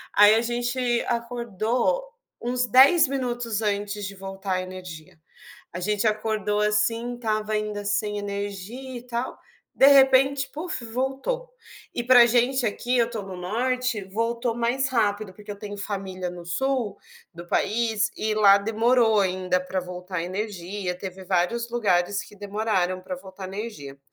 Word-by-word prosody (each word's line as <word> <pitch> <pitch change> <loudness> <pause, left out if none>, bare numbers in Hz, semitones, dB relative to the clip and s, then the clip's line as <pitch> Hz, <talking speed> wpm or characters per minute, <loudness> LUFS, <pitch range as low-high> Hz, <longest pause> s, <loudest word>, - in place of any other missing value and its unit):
aí 205 +1 +8
a 225 - +3
gente 240 +2 -2 0.3
acordou 235 - -1 0.4
uns 245 +1 0
10 275 - +7
minutos 240 -5 -2
antes 205 0 -2
de 195 +1 -6
voltar 195 0 -5
a 185 - 0
energia. 180 -4 -9 0.6
A 180 - -5
gente 210 +4 0
acordou 215 -1 0
assim, 225 +3 +1
estava 215 -2 -2
ainda 210 -1 -2
sem 205 +1 -1
energia 205 +5 -5
e - - -11
tal, 240 0 -3 0.4
de 270 - +6
repente, 270 0 +5
puf 310 -5 -5
voltou. 270 - -3 0.4
E 240 - -2
pra 250 0 +7
a - - +6
gente 245 +2 +2
aqui, 245 +4 -1
eu 235 0 +2
tô 225 -3 -4
no 190 -1 -8
Norte, 240 +4 -1
voltou 230 +4 -1
mais 240 +3 0
rápido, 210 -5 0
porque 210 +1 -11
eu 205 - -6
tenho 205 0 -7
família 195 -3 -4
no 175 -1 -10
sul, 235 +2 -1 0.4
do 170 +1 -9
país 220 0 +1
e 215 0 -1
lá 200 -2 +7
demorou 225 +2 +3
ainda 185 -1 +1
pra 185 +1 -3
voltar 180 0 -6
a - - -1
energia, 190 0 -4
teve 190 0 -8
vários 185 +6 0
lugares 200 -4 +1
que 210 - -15
demoraram 200 -3 -1
pra 185 0 -6
voltar 190 +1 -10
a - - -3
energia. 190 -9 -7
210 Hz, 155 wpm, -25 LUFS, 195-240 Hz, 0.6 s, aí